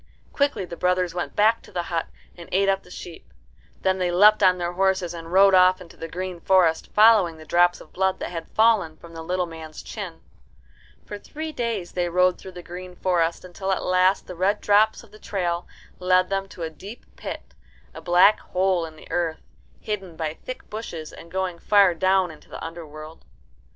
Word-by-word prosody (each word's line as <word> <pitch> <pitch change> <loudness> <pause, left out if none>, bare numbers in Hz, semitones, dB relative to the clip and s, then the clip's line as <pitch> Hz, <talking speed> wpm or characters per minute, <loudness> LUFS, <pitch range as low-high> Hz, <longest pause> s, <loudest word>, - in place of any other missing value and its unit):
Quickly 280 -9 0
the 175 - -8
brothers 180 0 0
went 175 0 -4
back 220 +2 +3
to - - -16
the 175 - -2
hut 165 -1 -2 0.3
and 170 -1 -12
ate 195 +1 +2
up 195 0 +2
the - - -19
sheep. 175 -2 -10 0.5
Then 190 0 +1
they 180 -1 +1
leapt 210 +4 +6
on 185 -2 +5
their 175 -1 -2
horses, 190 -2 +1
and 165 -1 -8
rode 195 +1 +6
off 185 0 +5
into 180 -2 -13
the 165 - -7
green 180 +1 -5
forest, 175 -3 +2
following 210 -6 +5
the 155 - -12
drops 175 +2 +3
of - - -16
blood 190 0 0
that - - -5
had 165 -2 -6
fallen 215 -8 +2
from 170 0 -14
the 165 - -7
little 180 +2 -1
man's 160 -2 -10
chin. - - -7 0.8
For 205 - -7
three 315 +8 -6
days 230 - -3
they 175 -1 -1
rode 180 +1 +2
through 190 - -10
the 175 -1 -9
green 180 +1 -9
forest, 175 -2 0
until 190 +2 -4
at 190 - -1
last 185 +1 +3
the - - -8
red 190 +4 +1
drops 210 +3 +3
of 225 - -18
the 215 - -15
trail 175 -4 -2 0.3
led 185 0 +2
them 195 0 -1
to 175 - -8
a 160 - -2
deep 200 +9 -11
pit, - - -8 0.4
a - - -9
black 180 +4 +5
hole 185 -2 0
in 160 - -13
the - - -15
earth, 165 -2 -1 0.4
hidden 195 -5 -5
by 160 -2 -3
thick 255 +9 -9
bushes 175 -8 -7
and 170 - -12
going 185 -1 -3
far 200 -2 +4
down 185 +1 +2
into 155 - -16
the - - -8
underworld. 160 -1 -9
180 Hz, 200 wpm, -24 LUFS, 170-195 Hz, 0.8 s, leapt